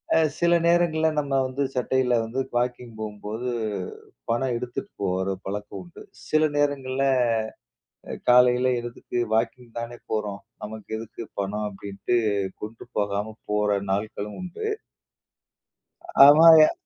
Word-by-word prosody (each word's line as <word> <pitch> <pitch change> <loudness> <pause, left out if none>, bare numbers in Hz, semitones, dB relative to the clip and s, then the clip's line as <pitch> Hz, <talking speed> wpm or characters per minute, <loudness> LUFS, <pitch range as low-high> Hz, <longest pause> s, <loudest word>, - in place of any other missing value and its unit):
அ - - +5 0.2
சில 170 0 +4
நேரங்கள்ல 165 -2 +3
நம்ம 140 -2 -2
வந்து 130 +2 -2
சட்டையில 125 0 +1
வந்து, 120 +4 -4 0.2
வாக்கிங் 120 -1 -2
போம்போது 110 +3 -5 0.8
பணம் 120 +2 +1
எடுத்துட்டு 120 0 -4 0.2
போற 95 0 0 0.2
பழக்கம் 100 0 -5
உண்டு. 85 - -14 0.3
சில 155 0 +3
நேரங்கள்ல 135 -2 0 1.1
அ - - -4 0.2
காலையில 125 +1 +5
எழுந்துட்டு, 120 +1 -6 0.2
"வாக்கிங் 115 +1 -2
தானே 120 +1 -6
போறோம், 105 -2 -2 0.2
நமக்கு 110 0 -8
எதுக்கு 115 +1 -8 0.2
பணம்?" 105 +2 -3
அப்படின்ட்டு 100 +4 -2 0.5
கொண்டு 110 +2 -7
போகாம 105 +1 -1 0.2
போற 105 -1 +2
நாள்களும் 105 +1 -3
உண்டு. 185 - -5 1.6
ஆமா, 150 +4 +8 0.2
எ - - +1
120 Hz, 115 wpm, -25 LUFS, 105-130 Hz, 1.6 s, ஆமா